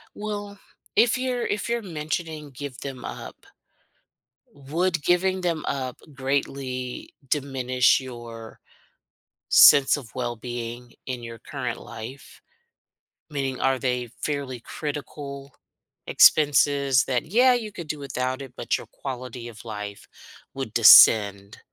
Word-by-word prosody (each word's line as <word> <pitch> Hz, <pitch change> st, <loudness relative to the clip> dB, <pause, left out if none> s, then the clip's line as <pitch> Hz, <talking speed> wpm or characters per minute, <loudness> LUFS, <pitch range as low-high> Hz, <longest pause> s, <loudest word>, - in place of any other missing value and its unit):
Well, 205 Hz, -1 st, -6 dB, 0.4 s
if 240 Hz, +1 st, +4 dB
you're 255 Hz, -2 st, -2 dB
if 205 Hz, +2 st, -2 dB
you're 235 Hz, 0 st, -1 dB
mentioning 155 Hz, -3 st, -5 dB
give 135 Hz, 0 st, -8 dB
them 130 Hz, -3 st, -7 dB
up -, -, -9 dB, 1.1 s
would 165 Hz, +5 st, -1 dB
giving 185 Hz, +1 st, +2 dB
them 165 Hz, -3 st, -1 dB
up 130 Hz, -2 st, -3 dB, 0.2 s
greatly 130 Hz, -2 st, -3 dB
diminish 130 Hz, -3 st, +2 dB
your 120 Hz, -3 st, -10 dB, 0.9 s
sense 140 Hz, -2 st, +7 dB
of 130 Hz, -7 st, -9 dB
well-being 120 Hz, 0 st, -5 dB
in 125 Hz, -2 st, -5 dB
your 115 Hz, 0 st, -8 dB
current -, -, -5 dB
life? 125 Hz, +5 st, -10 dB, 0.9 s
Meaning, 135 Hz, -3 st, -3 dB
are 135 Hz, 0 st, +2 dB
they 125 Hz, -2 st, -2 dB
fairly 140 Hz, -5 st, -3 dB
critical 140 Hz, -1 st, -7 dB, 0.5 s
expenses 140 Hz, -3 st, +4 dB
that, 125 Hz, -2 st, -1 dB
yeah, 245 Hz, +9 st, +4 dB
you 220 Hz, -3 st, -3 dB
could 170 Hz, -5 st, -8 dB
do 150 Hz, -, -3 dB
without 130 Hz, -1 st, -3 dB
it, 130 Hz, -2 st, -11 dB
but -, -, -1 dB
your -, -, -11 dB
quality 125 Hz, -2 st, -7 dB
of 110 Hz, -1 st, -12 dB
life 105 Hz, -2 st, -7 dB, 0.5 s
would -, -, -5 dB
descend? 100 Hz, -2 st, +7 dB
135 Hz, 120 wpm, -24 LUFS, 125-155 Hz, 1.1 s, sense